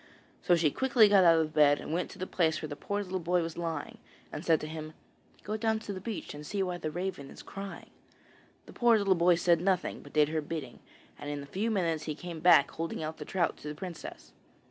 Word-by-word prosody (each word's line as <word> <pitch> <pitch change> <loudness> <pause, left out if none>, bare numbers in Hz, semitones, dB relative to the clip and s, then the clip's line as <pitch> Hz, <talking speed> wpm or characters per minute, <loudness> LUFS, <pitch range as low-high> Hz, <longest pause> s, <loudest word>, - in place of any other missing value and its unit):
So 175 - +4
she 160 -3 +2
quickly 250 - +4
got 200 -2 +6
out 165 -1 +7
of 155 -1 -1
bed 145 -1 +5
and - - -5
went 175 - -1
to - - -11
the 185 - -3
place 160 -4 +1
where 155 - -5
the 145 - -6
poor 205 +6 -3
little 185 -1 -3
boy 175 0 +1
was 165 -1 -5
lying, 165 -3 -4 0.3
and - - -6
said 160 -2 +3
to 155 - -5
him: 155 0 -7 0.5
'Go 215 +2 -3
down 220 0 +1
to 220 -2 -6
the 185 - -7
beach, 220 -1 -5
and 150 0 -8
see 195 +6 -2
why 180 -1 -3
the 155 - -3
raven 175 -4 -4
is - - -12
crying.' 195 0 -8 0.7
The - - -13
poor 235 -2 +4
little 200 -2 +3
boy 175 0 +4
said 170 -1 +3
nothing, 185 -1 0
but - - -14
did 150 -1 +4
her 160 0 -1
bidding, 150 -5 -6 0.4
and 145 - -6
in 145 -1 -4
a - - -9
few 195 +10 -2
minutes 165 -7 0
he 155 - -3
came 170 0 -7
back 165 -4 +6
holding 165 -1 -4
out 155 +1 -5
the - - -7
trout 175 -4 0
to - - -10
the 150 - -5
princess. 175 +1 -8
170 Hz, 245 wpm, -30 LUFS, 155-190 Hz, 0.7 s, out